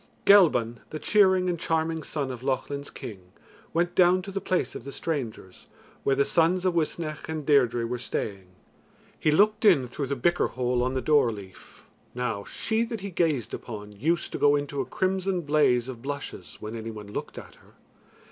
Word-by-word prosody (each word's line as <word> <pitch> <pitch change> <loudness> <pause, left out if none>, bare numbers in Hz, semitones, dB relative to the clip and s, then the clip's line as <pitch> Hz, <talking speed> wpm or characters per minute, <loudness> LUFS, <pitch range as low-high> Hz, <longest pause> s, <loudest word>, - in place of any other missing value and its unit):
Gelban, 155 - +5
the 155 - -5
cheering 190 0 +4
and 175 -2 -1
charming 160 0 0
son 140 -2 -3
of 125 -2 -7
Lochlin's 140 +2 -2
King, 105 -5 -8 0.5
went 175 +1 0
down 180 +1 +4
to 195 - -7
the 195 0 -3
place 185 - -1
of - - -7
the 140 - -7
strangers, 125 - -5 0.4
where 135 - +2
the 140 +1 +3
sons 175 +2 +2
of 185 - +2
Uisnech 160 -2 -2
and 155 -2 -4
Deirdre 125 -5 +3
were 120 +1 -3
staying. 100 -5 -4 0.7
He - - +2
looked 210 +8 +3
in 165 - +5
through 135 +3 -4
the 140 - -1
bicker 175 +8 +2
hole 125 -1 -1
on 130 +1 0
the 130 - -1
door 140 -4 +4
leaf. 100 -3 -12 0.3
Now 115 -5 -2
she 220 +1 -1
that 230 -3 -5
he 200 0 -5
gazed 155 - 0
upon 105 -3 -7
used 160 +12 -1
to - - -4
go 145 0 +5
into 145 -1 -2
a - - -3
crimson 190 -1 0
blaze 145 -6 +2
of 125 -3 -7
blushes 135 - -6
when 110 +2 -6
any 115 0 -5
one 105 -2 -8
looked - - -5
at - - -9
her. - - -23
145 Hz, 190 wpm, -27 LUFS, 120-175 Hz, 0.7 s, Gelban